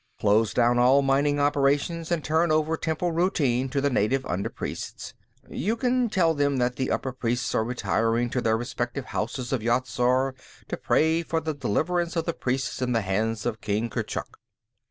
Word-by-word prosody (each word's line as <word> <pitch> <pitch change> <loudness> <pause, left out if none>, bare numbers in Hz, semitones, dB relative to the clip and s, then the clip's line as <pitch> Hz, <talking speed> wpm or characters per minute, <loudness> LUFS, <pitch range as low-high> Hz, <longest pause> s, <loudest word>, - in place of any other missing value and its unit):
Close 110 +1 +3
down 120 0 +3
all 130 +3 +5
mining 140 +2 +2
operations, 145 +4 +1
and 170 -3 0
turn 160 +1 +2
over 155 +1 +2
temple 160 +2 -1
routine 140 -7 +1
to 140 +1 -1
the 140 +1 +1
native 130 +4 +1
under 90 +3 -2
priests. - - -6 0.3
You 210 +9 -1
can 245 0 +1
tell 170 -5 +2
them 145 -2 +1
that 125 0 0
the 130 - -2
upper 130 - -1
priests 120 -1 -2
are 110 - +2
retiring 115 +1 0
to 125 - 0
their 110 -1 +2
respective 120 +2 -4
Houses 125 +2 -3
of 130 - 0
Yat 120 +3 +1
Zar 130 +2 +1 0.4
to - - -1
pray 160 +1 +2
for 165 0 -1
the 160 -1 -3
deliverance 170 - -1
of 165 -1 0
the 170 - -1
priests 130 -1 -2
in 125 -1 0
the 115 - +2
hands 110 +3 -1
of 115 -3 -2
King 110 +3 -1
Kurchuk. - - -4
130 Hz, 185 wpm, -26 LUFS, 120-160 Hz, 0.4 s, all